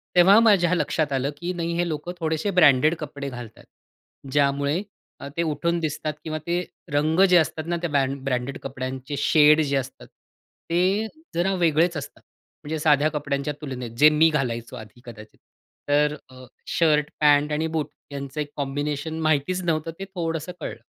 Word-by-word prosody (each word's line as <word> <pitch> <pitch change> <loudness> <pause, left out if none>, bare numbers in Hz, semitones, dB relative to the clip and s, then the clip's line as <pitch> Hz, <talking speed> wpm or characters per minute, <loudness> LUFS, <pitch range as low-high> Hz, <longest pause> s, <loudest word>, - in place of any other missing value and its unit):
तेव्हा 190 +5 +7
माझ्या 195 -6 +4
लक्षात 155 -3 -1
आलं, 135 +2 0
की 175 +2 -4
नाही 170 -1 -3
हे 175 0 +1
लोकं 155 +2 -4
थोडेसे 160 +4 -1
ब्रँडेड 150 +2 +5
कपडे 140 -2 -6
घालतात, 120 -3 -10 0.7
ज्यामुळे 140 +4 +1 0.6
ते - - +2
अ, - - 0
उठून 170 +3 -1
दिसतात. 155 -1 -3
किंवा 155 -1 -3
ते 175 +1 0 0.3
रंग 155 +4 +1
जे 180 - +6
असतात 160 0 0
ना, 175 0 -1
त्या 170 - -2
ब्रँड 140 -1 0
ब्रँडेड 130 0 -2
कपड्यांचे 130 +1 -5
शेड 150 +1 +5
जे 140 -2 0
असतात, 135 0 -6
ते 190 +6 -3 0.3
जरा 185 +3 +1
वेगळेच 170 -1 +2
असतात. 140 - -8 0.4
म्हणजे 155 +1 -4
साध्या 150 0 +3
कपड्यांच्या 145 -1 -2
तुलनेत 125 -5 -6
जे 150 +3 +7
मी 155 +2 +4
घालायचो, 120 -5 -2
आधी 110 0 -12
कदाचित. 110 -2 -12 0.5
तर 150 +1 +3
अ, 130 0 -13 0.2
शर्ट, 150 -3 +2
पॅन्ट 150 0 +4
आणि 155 +2 0
बूट 155 -2 -1 0.2
यांचं 140 +1 -5
एक 145 - -5
कॉम्बिनेशन 145 +3 -3
माहितीच 155 +4 +1
नव्हतं, 165 -1 -1
ते 195 - -5
थोडंसं 165 -1 -3
कळलं. - - -6
150 Hz, 165 wpm, -24 LUFS, 140-165 Hz, 0.7 s, तेव्हा